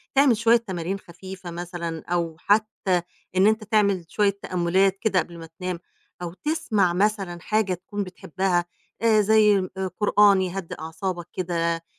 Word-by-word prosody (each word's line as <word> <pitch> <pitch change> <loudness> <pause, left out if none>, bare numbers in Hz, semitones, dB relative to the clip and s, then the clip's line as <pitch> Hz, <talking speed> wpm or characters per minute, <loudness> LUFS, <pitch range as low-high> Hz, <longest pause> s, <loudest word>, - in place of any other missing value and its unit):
تعمل 270 -5 +5
شوية 230 +1 +5
تمارين 190 -4 -4
خفيفة 185 0 -10
مثلًا 170 -1 -5
أو 170 -2 -1
حتّى 205 -3 +1 0.3
إن 190 +2 +5
أنت 220 0 +2
تعمل 200 -4 +2
شوية 200 -1 +1
تأمُّلات 185 +2 +1
كده 200 -4 +2
قبل 170 0 -5
ما 165 - -8
تنام 180 -2 -3 0.4
أو 170 -1 -5
تسمع 215 - 0
مثلًا 195 -2 0
حاجة 215 -1 +1
تكون 190 +3 -4
بتحبّها 180 -1 -1 0.4
آآ 220 -2 +5
زي 210 0 +5 0.2
آآ 190 0 -1
قرآن 205 -2 +5
يهدّي 185 -1 -4
أعصابك 170 +2 -4
كده، 170 -2 -1
190 Hz, 145 wpm, -24 LUFS, 175-210 Hz, 0.4 s, تعمل